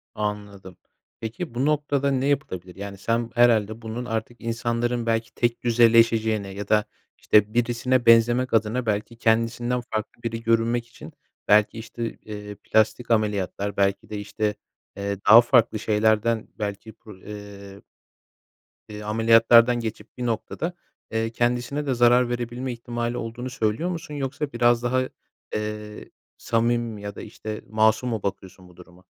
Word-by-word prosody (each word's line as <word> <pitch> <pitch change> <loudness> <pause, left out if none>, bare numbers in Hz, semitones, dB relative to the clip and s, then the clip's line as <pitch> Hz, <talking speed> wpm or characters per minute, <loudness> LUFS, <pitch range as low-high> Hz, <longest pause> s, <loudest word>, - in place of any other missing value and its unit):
Anladım. 105 -3 -5 0.4
Peki, 115 +6 -6
bu 130 +3 0
noktada 145 -2 +1
ne 135 0 0
yapılabilir? 95 - -2
Yani, 100 0 -7
sen 115 +3 -1
herhâlde 115 -2 +3
bunun 115 +2 -5
artık 115 +1 -4
insanların 120 +1 -1
belki 115 0 -1
tekdüzeleşeceğine 115 -3 +3
ya 100 +1 -6
da, 105 -1 +3 0.3
işte, 105 0 +3
birisine 120 +1 +1
benzemek 120 +2 +4
adına 115 +3 +1
belki 110 +2 -2
kendisinden 115 +2 +1
farklı 110 -1 -6
biri 115 0 -3
görünmek 115 +1 +1
için, - - -13 0.3
belki, 105 +2 +4
işte, 115 +1 -7
eee, 105 -1 -9
plastik 110 +3 0
ameliyatlar, 100 -2 0
belki 100 0 0
de, 105 - -5
işte, 105 +1 -2 0.4
eee, 100 0 -3
daha 110 +3 +10
farklı 120 -3 +3
şeylerden, 110 +1 +1
belki 105 +1 -5
kur 105 -3 -15
eee 100 -1 -10 1.1
eee, 105 0 -8
ameliyatlardan 115 +2 +5
geçip 110 -2 -7
bir 125 - -3
noktada, 120 +9 -3 0.4
eee, 115 0 -1
kendisine 120 +5 -1
de 135 - 0
zarar 120 0 +4
verebilme 120 +1 -3
ihtimali 120 0 -4
olduğunu 120 +3 -5
söylüyor 125 +6 -1
musun? 165 -4 -6
Yoksa 140 0 -4
biraz 120 0 +3
daha, 130 +1 0 0.5
eee, 105 0 -5 0.3
samimi 115 0 0
mi 105 - -9
ya 100 -1 -6
da, - - -8
işte, 110 0 -7
masum 110 +3 +2
mu 110 -4 -3
bakıyorsun 95 -2 -6
bu 90 - -19
duruma? 90 +1 -16
115 Hz, 140 wpm, -24 LUFS, 105-120 Hz, 1.1 s, daha